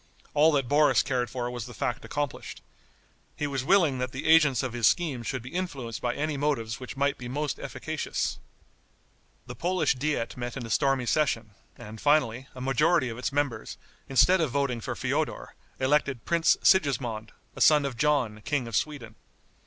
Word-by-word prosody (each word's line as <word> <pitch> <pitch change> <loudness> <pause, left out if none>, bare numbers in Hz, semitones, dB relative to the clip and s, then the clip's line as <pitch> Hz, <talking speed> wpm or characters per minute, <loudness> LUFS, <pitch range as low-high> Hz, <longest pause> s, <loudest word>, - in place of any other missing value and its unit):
All 150 +2 +5
that 135 -4 +1
Boris 150 +3 +4
cared 125 -2 -1
for 120 -2 -3
was 120 -2 -5
the 120 - -11
fact - - -2
accomplished. 145 -3 -5 0.7
He 150 - -2
was 135 -3 -2
willing 160 -5 +3
that 125 0 -2
the 130 - -6
agents 150 -6 +5
of 130 -2 -3
his 120 -3 +3
schemes 140 -9 0
should 130 -3 -3
be 130 - -9
influenced 135 - -4
by 120 -1 -1
any 150 0 -2
motives 130 -6 -1
which 130 +1 -8
might 140 0 0
be 125 - -6
most 145 +3 -3
efficacious. - - -3 1.1
The - - -7
Polish 175 -4 +1
diet 140 -3 -2
met 120 +1 -5
in 125 - -5
a 115 - -7
stormy 135 0 +2
session, 120 -6 0 0.3
and 110 -2 -10
finally, 135 -4 +2
a 125 - -8
majority 135 +2 +2
of 115 +1 -7
its 125 - -2
members, 145 -3 -2 0.3
instead 180 +7 +4
of 160 - +1
voting 130 -3 -1
for - - -4
Feodor, - - -2 0.3
elected 135 -2 +1
Prince 170 -1 +3
Sigismond, 120 - +2 0.2
a - - -7
son 150 -2 +6
of 135 -3 -3
John, 125 -7 +1
King 145 -3 -1
of 115 - -5
Sweden. 130 -5 -2
135 Hz, 180 wpm, -27 LUFS, 120-150 Hz, 1.1 s, son